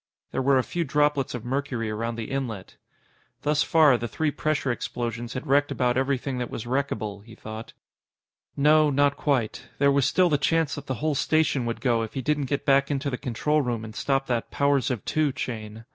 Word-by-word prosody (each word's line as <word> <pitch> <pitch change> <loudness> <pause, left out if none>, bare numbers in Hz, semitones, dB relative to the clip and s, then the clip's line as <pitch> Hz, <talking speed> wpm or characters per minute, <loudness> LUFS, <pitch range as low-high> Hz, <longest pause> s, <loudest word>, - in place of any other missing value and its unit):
There - - -1
were 135 0 +4
a 130 - +2
few 170 +6 -2
droplets 145 -3 +1
of 120 -1 -7
mercury 125 -4 -2
around 115 +2 -3
the 115 +1 -6
inlet. 120 -8 -4 0.7
Thus 150 0 +2
far, 150 -6 +5
the 120 - -3
three 155 +7 -1
pressure 150 -3 -1
explosions 120 -1 -4
had 130 +3 -5
wrecked 145 0 +3
about 125 -2 +1
everything 135 0 -1
that 125 - -3
was 115 - -6
wreckable, 110 -6 -2
he 115 0 -14
thought. 110 +1 -8 0.8
No, 150 +1 +5
not 145 0 +2
quite. 135 -7 -1
There 140 0 +4
was 140 -2 +3
still 185 -1 +3
the 150 -4 +2
chance 165 +1 +1
that 145 -1 -7
the 130 - -2
whole 155 - +2
station 145 -3 +1
would 115 - -3
go 120 -3 +2
if 110 - -5
he 135 - -1
didn't 150 +1 0
get 140 +2 -2
back 140 0 +4
into 140 0 -1
the - - -1
control 150 +5 0
room 120 -4 -2
and 110 0 -10
stop 135 0 0
that 120 -3 -2
"powers 140 -3 +1
of 125 -5 -3
two" 155 -2 +1
chain. 110 -3 -6
135 Hz, 205 wpm, -26 LUFS, 120-145 Hz, 0.8 s, far